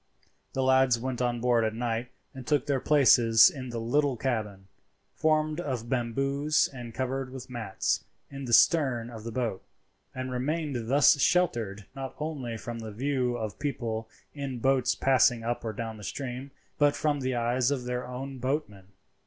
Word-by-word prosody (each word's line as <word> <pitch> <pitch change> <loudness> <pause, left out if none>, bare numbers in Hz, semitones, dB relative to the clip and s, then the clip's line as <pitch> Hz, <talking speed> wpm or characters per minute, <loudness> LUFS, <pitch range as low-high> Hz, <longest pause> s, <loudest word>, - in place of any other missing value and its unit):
The 135 - 0
lads 130 -2 +4
went 125 +1 -3
on 120 -1 0
board 120 -2 +3
at 110 0 -1
night 120 +1 -2 0.2
and 130 -2 -10
took 150 -2 +2
their 140 -2 +1
places 120 -2 +6
in 130 -6 -7
the 120 - -5
little 135 +3 +1
cabin, 105 -6 -3 0.5
formed 155 0 +1
of 125 -7 -4
bamboos 135 +5 +1
and 120 -3 -7
covered 130 +2 -3
with 130 -1 -9
mats, 100 - -1 0.3
in 135 -1 -6
the 120 - -5
stern 125 -5 +4
of 110 -2 -9
the 115 - -5
boat, 115 -5 -2 0.5
and 130 0 -4
remained 130 -2 -2
thus 140 +1 +5
sheltered 115 - +1
not 135 -1 -6
only 140 -7 -4
from 115 +1 -6
the 110 -1 -7
view 125 +1 -1
of 110 -3 -5
people 115 -6 -3 0.2
in 140 -3 -5
boats 130 0 +2
passing 125 -3 +3
up 120 +1 -2
or 115 - -2
down 110 0 -5
the 105 - -11
stream, 130 +3 -5 0.3
but 145 -1 +4
from 150 -2 0
the 130 -1 -1
eyes 120 +2 +1
of 140 -3 -1
their 125 0 -3
own 130 +1 -6
boatmen. 125 -8 -3
125 Hz, 170 wpm, -28 LUFS, 115-135 Hz, 0.5 s, places